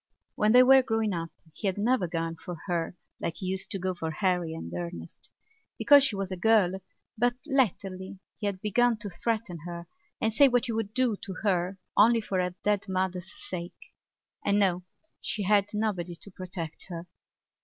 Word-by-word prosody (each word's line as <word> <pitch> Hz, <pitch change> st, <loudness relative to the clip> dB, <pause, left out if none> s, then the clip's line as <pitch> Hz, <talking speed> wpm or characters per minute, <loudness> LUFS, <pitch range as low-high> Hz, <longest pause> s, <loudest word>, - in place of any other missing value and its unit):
When 210 Hz, 0 st, +2 dB
they 250 Hz, +1 st, +9 dB
were 265 Hz, +1 st, +7 dB
growing 225 Hz, -4 st, 0 dB
up 165 Hz, -1 st, -3 dB, 0.2 s
he 205 Hz, -, -3 dB
had 190 Hz, -, 0 dB
never 215 Hz, -2 st, +2 dB
gone 165 Hz, 0 st, -2 dB
for 175 Hz, +2 st, -7 dB
her 175 Hz, -1 st, -2 dB, 0.2 s
like 165 Hz, -, -3 dB
he 190 Hz, -, -6 dB
used 190 Hz, +1 st, -2 dB
to 200 Hz, -, -3 dB
go 185 Hz, 0 st, -1 dB
for 165 Hz, -2 st, -4 dB
Harry 175 Hz, -1 st, 0 dB
and 85 Hz, -, -7 dB
Ernest, 85 Hz, -1 st, -7 dB, 0.5 s
because 285 Hz, -1 st, +7 dB
she 265 Hz, -7 st, +3 dB
was 195 Hz, -1 st, -3 dB
a -, -, -1 dB
girl; 190 Hz, -2 st, +3 dB, 0.4 s
but 245 Hz, +1 st, +3 dB
latterly 195 Hz, -, -1 dB, 0.2 s
he 210 Hz, -, -1 dB
had 190 Hz, -2 st, -3 dB
begun 235 Hz, +3 st, +2 dB
to 205 Hz, -2 st, -7 dB
threaten 210 Hz, -2 st, -2 dB
her 170 Hz, 0 st, -6 dB, 0.3 s
and 220 Hz, 0 st, +1 dB
say 280 Hz, +5 st, +7 dB
what 245 Hz, -2 st, +2 dB
he 235 Hz, -, -2 dB
would 220 Hz, -1 st, -3 dB
do 255 Hz, -4 st, +2 dB
to 190 Hz, -1 st, -7 dB
her 185 Hz, -2 st, +1 dB, 0.2 s
only 230 Hz, +3 st, +6 dB
for 195 Hz, -4 st, -1 dB
her 180 Hz, 0 st, -2 dB
dead 205 Hz, -1 st, +1 dB
mother's 185 Hz, -1 st, -2 dB, 0.2 s
sake. 175 Hz, -1 st, -5 dB, 0.7 s
And 200 Hz, 0 st, +2 dB
now 185 Hz, -3 st, +2 dB, 0.4 s
she 210 Hz, -, -2 dB
had 200 Hz, 0 st, +4 dB
nobody 200 Hz, -5 st, -2 dB
to 200 Hz, +4 st, -11 dB
protect 180 Hz, -3 st, -6 dB
her. 170 Hz, -1 st, -6 dB
190 Hz, 185 wpm, -28 LUFS, 175-220 Hz, 0.7 s, they